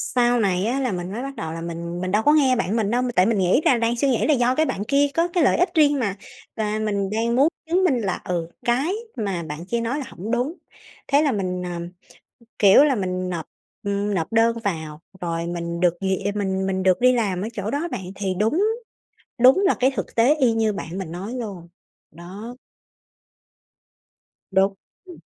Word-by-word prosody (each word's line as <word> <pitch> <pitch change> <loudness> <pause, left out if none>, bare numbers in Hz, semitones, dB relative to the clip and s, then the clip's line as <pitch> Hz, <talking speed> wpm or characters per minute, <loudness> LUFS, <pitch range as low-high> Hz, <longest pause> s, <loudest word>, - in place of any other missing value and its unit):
Sau 240 0 +3
này 190 -2 +1
á 255 +4 0
là 255 -5 0
mình 180 0 -4
mới 230 +4 -4
bắt 275 0 -6
đầu 160 0 -5
là 165 - -6
mình 170 +1 -5
mình 185 0 -2
đâu 215 +2 +2
có 295 - +5
nghe 270 -4 +4
bạn 225 -2 -1
mình 215 -3 +1
đâu, 245 +1 +2
m 250 - -1
tại 185 - +5
mình 225 -2 +1
nghĩ 190 - +3
là 250 - +5
đang 230 +1 +1
suy 275 +3 +1
nghĩ 245 - +1
là 305 - +4
do 245 0 +2
cái 315 - +2
bạn 205 - -3
kia 285 +1 +3
có 335 +1 +2
cái 345 -2 +1
lợi - - +3
ích 360 - +1
riêng 290 -3 +4
mà. 200 -5 -1 0.4
Và 215 0 -1
mình 200 -2 -1
đang 230 +2 0
muốn 280 +4 +5 0.2
chứng 370 +2 +2
minh 265 -9 +2
là, 195 -4 -2
ừ, 170 -2 -3 0.2
cái 265 +10 +1 0.2
mà 195 -7 -2
bạn 155 +2 -7
kia 235 +4 -1
nói 250 +6 -2
là 270 - -5
hổng 210 +6 -7
đúng. 250 +7 0 0.5
Thế 285 +1 +4
là 290 -3 +2
mình, 180 -3 -2
à, 175 -1 -4 0.8
kiểu 200 +7 +7
là, 280 -4 +3
mình 185 -2 -2
nộp, 170 -3 -4 0.4
ừm, 200 0 -1
nộp 170 +3 -2
đơn 230 0 +3
vào 160 -5 -4 0.2
rồi 170 -1 -2
mình 170 0 -4
được 175 -1 +3
duyệt 195 +1 -1
mình 190 -2 -1
mình 190 -1 -1
được 185 -1 +3
đi 250 +1 +5
làm 200 -6 0
ở 215 - -2
chỗ 210 +1 -4
đó 300 +5 -1
bạn, 190 - -4
thì 195 -2 -2
đúng 255 - +2 0.8
đúng 255 +8 +6
là - - +4
cái 260 +2 +3
thực - - -4
tế 245 +6 +4
y 255 -6 +3
như 220 -1 +1
bạn 185 -2 -6
mình 175 -4 -5
nói 195 +7 -6
luôn. 200 -8 -6 0.4
Đó. 190 +9 -9 2.0
Đúng, 195 +1 +3 0.3
ừm. 355 -2 -12
210 Hz, 220 wpm, -23 LUFS, 185-250 Hz, 2.0 s, kiểu